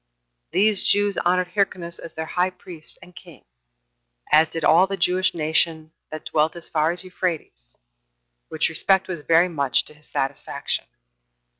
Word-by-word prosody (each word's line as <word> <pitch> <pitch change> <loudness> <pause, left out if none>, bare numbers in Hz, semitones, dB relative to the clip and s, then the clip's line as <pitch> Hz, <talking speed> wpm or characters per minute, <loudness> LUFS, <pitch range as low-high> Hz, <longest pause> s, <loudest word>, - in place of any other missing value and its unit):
These 205 0 +3
Jews 205 -1 +2
honored 180 +1 +1
Hyrcanus 180 -3 -2
as 165 - -10
their 160 - -3
high 180 +3 0
priest 175 -3 -8
and 180 - -16
king, 170 -6 -14 0.9
as 155 +1 +5
did 165 -1 -5
all 175 +5 +5
the 195 0 -3
Jewish 185 +1 +1
nation 160 0 0 0.2
that 155 0 -8
dwelt 155 +2 +1
as 170 - -8
far 155 0 +1
as 175 +2 -1
Euphrates; 165 - -5 0.7
which 160 0 +1
respect 190 +4 +3
was 180 -3 -4
very 165 +3 +4
much 140 -6 0
to - - -13
his 150 0 -18
satisfaction. 135 +1 -2
170 Hz, 155 wpm, -23 LUFS, 155-185 Hz, 0.9 s, as